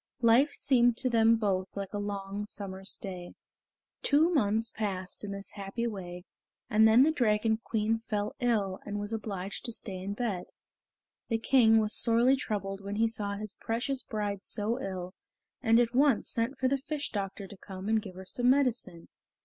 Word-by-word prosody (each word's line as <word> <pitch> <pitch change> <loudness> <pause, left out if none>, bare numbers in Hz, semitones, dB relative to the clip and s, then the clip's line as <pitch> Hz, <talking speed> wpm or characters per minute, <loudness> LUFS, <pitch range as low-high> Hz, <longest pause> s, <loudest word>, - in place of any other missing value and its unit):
Life 245 +6 +5
seemed 245 -3 +3
to 255 -1 0
them 225 0 +5
both 195 -4 0
like 200 0 -5
a 205 - -2
long 200 0 -4
summer's 195 -1 -4
day. 180 -2 -8 0.7
Two 315 +5 +3
months 225 -4 +2
passed 195 -3 -3
in 205 - -5
this 200 0 -6
happy 200 +3 -4
way, 180 -5 -5 0.5
and 220 +1 +6
then 225 +4 +7
the 310 - +4
Dragon 220 -5 +2
Queen 225 0 0
fell 210 -2 -3
ill 210 -6 0
and 205 0 -4
was 205 +2 -3
obliged 200 -3 -4
to 235 - -1
stay 190 -4 -4
in 200 +2 -4
bed. 210 -6 -2 0.8
The 225 - +2
King 225 -1 +5
was 215 -1 0
sorely 240 +3 +4
troubled 200 -6 -4
when 200 +1 -4
he 225 +2 +3
saw 205 -3 -3
his 210 0 -6
precious 250 +4 -2
bride 205 -3 -3
so 220 +5 -1
ill, 185 -1 -5 0.5
and 225 -2 +4
at 235 0 +2
once 270 -2 +3
sent 235 +4 -1
for 260 - +1
the 275 +1 +1
fish 290 +1 -4
doctor 195 -1 -4
to 195 +1 -11
come 190 0 -8
and 220 0 +2
give 190 -3 -10
her 190 +1 -9
some 245 +6 +1
medicine. 250 -10 +1
215 Hz, 180 wpm, -30 LUFS, 195-235 Hz, 0.8 s, then